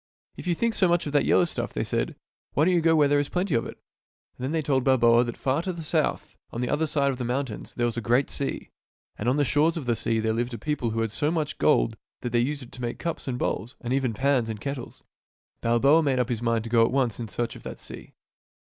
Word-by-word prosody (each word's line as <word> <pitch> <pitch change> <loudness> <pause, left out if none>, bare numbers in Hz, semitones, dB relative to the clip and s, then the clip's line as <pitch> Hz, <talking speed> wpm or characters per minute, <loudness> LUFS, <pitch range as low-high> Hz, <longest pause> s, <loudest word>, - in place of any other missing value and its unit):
" - - -54
If - - -7
you 175 - +2
think 230 +5 0
so 190 - +3
much 175 0 +2
of 145 - -4
that 145 - +3
yellow 180 - +4
stuff," 165 - -4
they - - -1
said, - - -1 0.2
" - - -50
why 150 - +3
don't 185 - +3
you 175 - +3
go 165 0 +4
where 150 -2 +5
there 145 0 +3
is 145 - -1
plenty 180 -2 -1
of 115 - +1
it? - - -9 0.3
" - - -56
And - - -9
then 130 - -1
they 160 -1 0
told 135 -2 +1
Balboa 120 -3 +5
that 120 - -5
far 135 +4 0
to 185 - -3
the 170 -2 -7
south, - - -1
on 115 - -6
the 125 - -1
other 155 +2 +1
side 140 -2 +1
of 130 - -5
the - - -2
mountains, 125 -2 -3
there 120 - +1
was 120 0 -2
a - - -1
great 120 +5 +2
sea, 140 - -3 0.4
and 115 - -1
on 130 - +2
the 145 - +3
shores 150 +6 +2
of 150 - -4
the 120 -1 +1
sea" 115 0 0
there 110 0 0
lived 120 +1 -2
a - - -5
people 130 0 -2
who 115 +1 -1
had 115 -2 -1
so 145 +7 0
much 155 -3 -2
gold - - +3 0.2
that 120 - -3
they 120 - +3
used 140 +3 -1
it 120 - -13
to 125 - -10
make 120 -1 -3
cups 170 -4 -4
and 125 -2 -2
bowls 115 0 -2
and 120 +1 -3
even 130 -4 0
pans 130 -2 +1
and 110 -2 -4
kettles. 140 -1 -6 0.6
Balboa 135 +7 +4
made 140 -4 +1
up 125 0 +1
his 120 -2 -2
mind 115 -2 +1
to 115 - -6
go 115 -1 +5
at 115 - +2
once 125 -6 0
in 115 - -4
search 120 +2 -3
of - - -11
that - - -7
sea. - - -10
130 Hz, 290 wpm, -26 LUFS, 120-150 Hz, 0.6 s, where